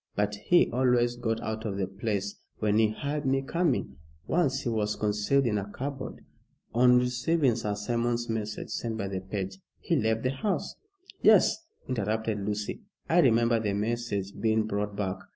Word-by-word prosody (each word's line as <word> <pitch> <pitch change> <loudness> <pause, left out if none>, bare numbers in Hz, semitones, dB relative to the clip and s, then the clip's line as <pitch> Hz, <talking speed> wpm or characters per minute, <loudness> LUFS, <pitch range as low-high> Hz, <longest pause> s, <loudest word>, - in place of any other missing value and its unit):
But 105 0 +1
he 175 - +6
always 120 -1 +2
got 115 -2 -1
out 110 0 -4
of 100 -3 -3
the 100 - 0
place 100 +1 -3 0.2
when 105 0 +2
he 110 - +5
heard 145 +6 -3
me 135 0 +1
coming. 135 - 0 0.3
Once 165 -6 +1
he - - -2
was 105 -2 0
concealed 105 +6 +1
in 105 -3 +1
a 100 +1 -6
cupboard. 135 +3 -6 0.5
On 125 +1 +6
receiving 125 +2 +2
Sir 105 -3 -2
Simon's 120 +3 -1
message 110 -2 -3
sent 115 -2 -3
by 100 -3 -2
the 95 -1 -3
page, 95 0 -5 0.2
he 170 - 0
left 110 -4 +1
the 130 - +1
house 190 +10 -2 0.3
" 370 - -21
"Yes," - - +6 0.3
interrupted 110 -2 -1
Lucy. 105 - -3 0.3
"I 170 - +4
remember 115 -4 +4
the 105 -2 -1
message 105 -2 -2
being 110 0 +2
brought 105 -1 -2
back." 100 -2 -2
110 Hz, 170 wpm, -28 LUFS, 105-125 Hz, 0.5 s, he